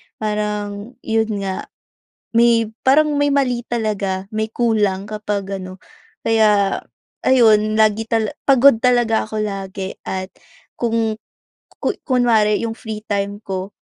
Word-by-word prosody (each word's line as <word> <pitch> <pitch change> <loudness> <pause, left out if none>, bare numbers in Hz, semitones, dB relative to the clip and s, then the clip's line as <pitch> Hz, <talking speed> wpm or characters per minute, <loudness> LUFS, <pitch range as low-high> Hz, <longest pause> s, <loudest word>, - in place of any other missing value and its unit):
parang 210 +1 -3
'yon 220 0 +1 0.2
nga, 190 -1 -4 0.7
may 230 -1 +4 0.2
parang 300 +3 +5
may 290 0 +2
mali 250 -4 0
talaga, 200 -5 -2
may 220 +1 -3
kulang 210 -4 0
kapag 205 -2 -3
ano. 185 0 -9 0.4
Kaya 210 -3 +3 0.5
ayun, 215 -4 +4
lagi 215 0 +2
tal 225 -1 0 0.2
pagod 275 -2 +6
talaga 240 -2 +2
ako 215 0 -3
lagi 195 -2 -5
at 185 0 -4 0.5
kung 225 -2 0 0.6
ku - - -1 0.2
kunwari 230 -4 +3
yung 230 - -2
free 220 -2 -7
time 200 -1 -2
ko, 190 0 -4
215 Hz, 120 wpm, -19 LUFS, 205-230 Hz, 0.7 s, pagod